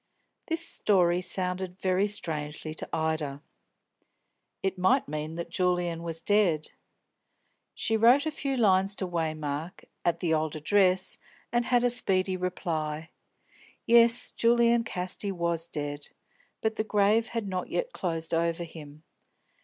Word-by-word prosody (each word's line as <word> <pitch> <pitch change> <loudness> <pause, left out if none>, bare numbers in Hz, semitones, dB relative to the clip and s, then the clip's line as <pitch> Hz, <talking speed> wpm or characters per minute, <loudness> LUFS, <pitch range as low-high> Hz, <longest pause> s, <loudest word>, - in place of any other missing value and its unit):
This 330 0 +1
story 180 -3 +2
sounded 180 0 -2
very 190 +2 +1
strangely 155 -5 -1
to - - -4
Ida. 160 -3 -2 1.2
It 190 0 0
might 250 +10 +3
mean 155 +2 -4
that 170 0 -6
Julian 180 -2 0
was 165 -1 -6
dead. 190 -7 +2 1.0
She 225 - 0
wrote 245 +6 +5
a 315 - -1
few 275 -2 -3
lines 195 -3 +3
to 190 - -2
Waymark, 155 -1 -3 0.2
at 170 - +1
the 170 -3 0
old 155 0 0
address, 185 +3 +2 0.3
and 240 0 +1
had 245 0 +2
a 245 - +3
speedy 190 -5 +1
reply. 160 -3 -3 0.7
Yes, 235 0 +5
Julian 235 0 +3
Casti 185 -1 -3
was 170 -2 -2
dead, 145 -2 -5 0.5
but 220 0 -1
the - - +1
grave 215 +2 +2
had 230 -3 -4
not 185 -1 -3
yet - - -2
closed 165 -3 -3
over 170 +1 0
him. 155 -2 -11
180 Hz, 135 wpm, -28 LUFS, 160-210 Hz, 1.2 s, wrote